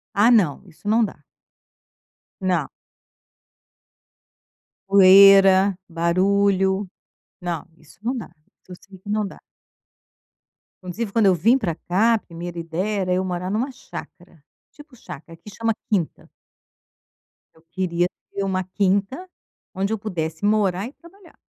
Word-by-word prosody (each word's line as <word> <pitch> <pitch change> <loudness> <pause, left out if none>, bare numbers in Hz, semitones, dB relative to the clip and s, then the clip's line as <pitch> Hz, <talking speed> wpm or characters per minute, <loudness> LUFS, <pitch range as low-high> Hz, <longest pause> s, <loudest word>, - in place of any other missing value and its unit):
Ah 205 +4 +5
não, 190 - +3
isso 175 +4 -14
não 225 +2 +3
dá. 190 -8 -5 1.2
Não. 180 -6 0 2.2
Poeira, 195 0 +7
barulho. 190 +3 +1 0.5
Não, 175 -3 -4
isso 155 -2 -21
não 245 +4 -2
dá. 230 - -6 0.4
Isso 185 - -14
eu - - -7
sei 190 -1 -14
que 190 - -15
não 210 0 0
dá. - - -11 1.5
Inclusive, 200 +4 -5
quando 220 -3 +3
eu 190 - +5
vim 220 - +3
para 185 -11 -3
cá, 200 +8 +1
a - - +1
primeira 175 -1 -8
ideia 185 +5 -2
era 180 0 -1
eu 185 +1 0
morar 180 0 -4
em 200 - -2
uma 255 +5 -1
chácara. 175 - -12 0.3
Tipo 295 -4 -16
chácara, 165 -6 -11
aqui 165 +5 -13
chama 225 +3 -1 0.2
quinta. 185 -7 -2 1.2
Eu 160 - -24
queria 175 -1 0 0.2
ter 200 - -3
uma 190 -1 -1
quinta, 200 - -1 0.5
onde 195 +3 -1
eu 220 - -3
pudesse 160 -6 -5
morar 205 -1 +1
e 265 - -12
trabalhar. 350 +2 -19
195 Hz, 135 wpm, -22 LUFS, 175-215 Hz, 2.2 s, Poeira